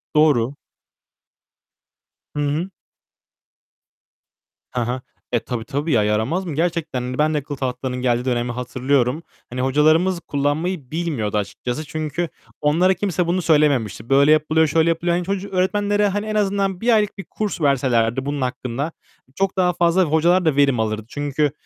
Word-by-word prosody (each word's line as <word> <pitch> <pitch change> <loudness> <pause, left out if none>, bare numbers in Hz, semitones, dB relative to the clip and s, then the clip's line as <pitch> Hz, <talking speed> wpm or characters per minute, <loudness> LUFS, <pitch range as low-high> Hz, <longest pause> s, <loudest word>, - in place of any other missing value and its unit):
Doğru. 140 -5 +3 1.8
Hı - - -2
hı. 165 +6 -2 2.1
Hı 125 - +1
hı. 125 +2 -2 0.3
Eee, 120 - +3
tabii, 115 -1 -5
tabii, 145 +3 -2
ya, 110 -4 +4
yaramaz 110 - 0
mı? 155 -5 -4
Gerçekten, 160 -5 -1
hani, 125 +1 -4
ben 155 +1 +2
de - - +1
akıllı 145 0 -5
tahtalarının 125 -1 -3
geldiği 120 -1 +1
dönemi 120 -1 0
hatırlıyorum. 125 +4 0 0.3
Hani, 125 +1 -4
hocalarımız 155 +7 +3
kullanmayı 145 +1 -2
bilmiyordu 145 -11 -2
açıkçası. 120 +8 -4
Çünkü 155 +2 -3 0.3
onlara 170 +6 +3
kimse 180 -3 -1
bunu 180 +1 +1
söylememişti. 140 - +1
Böyle 140 +2 +5
yapılıyor, 155 +1 +3
şöyle 160 +2 +2
yapılıyor. 170 +1 +1
Hani 180 - -2
çocu 195 +1 -3
öğretmenlere, 205 +2 +1
hani, 205 +2 -2
en 215 0 -3
azından 195 -2 0
1 235 0 +3
aylık 210 -1 0
bir 195 - -6
kurs 210 -5 -4
verselerdi 130 -3 +2
bunun 145 -1 -2
hakkında, 125 0 -3
hani, 150 -4 -11
çok 195 0 -1
daha 180 -1 +3
fazla, 175 +2 +3
hocalar 170 +3 +3
da 155 -3 +2
verim 140 -4 +3
alırdı. 110 0 -1
Çünkü 145 +1 -1
150 Hz, 155 wpm, -21 LUFS, 125-175 Hz, 2.1 s, Böyle